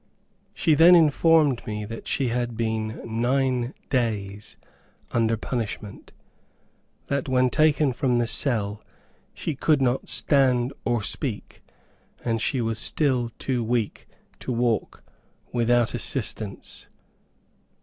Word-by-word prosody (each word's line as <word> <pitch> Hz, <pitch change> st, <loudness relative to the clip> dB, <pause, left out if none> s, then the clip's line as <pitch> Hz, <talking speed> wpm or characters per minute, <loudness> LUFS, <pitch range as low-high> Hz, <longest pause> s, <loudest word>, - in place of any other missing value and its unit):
She 160 Hz, -, +2 dB
then 170 Hz, +4 st, +7 dB
informed 155 Hz, -4 st, +4 dB
me 105 Hz, -1 st, -4 dB
that 115 Hz, +2 st, -8 dB
she 130 Hz, -3 st, 0 dB
had 120 Hz, -1 st, -2 dB
been 110 Hz, -1 st, -2 dB
nine 125 Hz, +2 st, 0 dB, 0.2 s
days 105 Hz, -6 st, -2 dB, 0.5 s
under 115 Hz, -1 st, +1 dB
punishment, 105 Hz, -3 st, -5 dB, 0.9 s
that 140 Hz, -1 st, -2 dB
when 130 Hz, -1 st, +2 dB
taken 155 Hz, -3 st, +3 dB
from 125 Hz, -1 st, 0 dB
the 120 Hz, -, +1 dB
cell 110 Hz, -4 st, +1 dB, 0.5 s
she 160 Hz, -, -3 dB
could 150 Hz, +2 st, +2 dB
not 130 Hz, -1 st, 0 dB
stand 130 Hz, -3 st, +2 dB
or 120 Hz, -3 st, 0 dB
speak, -, -, -4 dB, 0.6 s
and 115 Hz, -2 st, 0 dB
she 130 Hz, -, 0 dB
was 115 Hz, -1 st, -1 dB
still 130 Hz, -5 st, +1 dB
too 125 Hz, -3 st, -2 dB
weak 115 Hz, -2 st, -2 dB, 0.3 s
to -, -, -5 dB
walk 120 Hz, -2 st, -1 dB, 0.5 s
without 120 Hz, -1 st, +2 dB
assistance. 110 Hz, -4 st, -3 dB
120 Hz, 115 wpm, -24 LUFS, 115-135 Hz, 0.9 s, then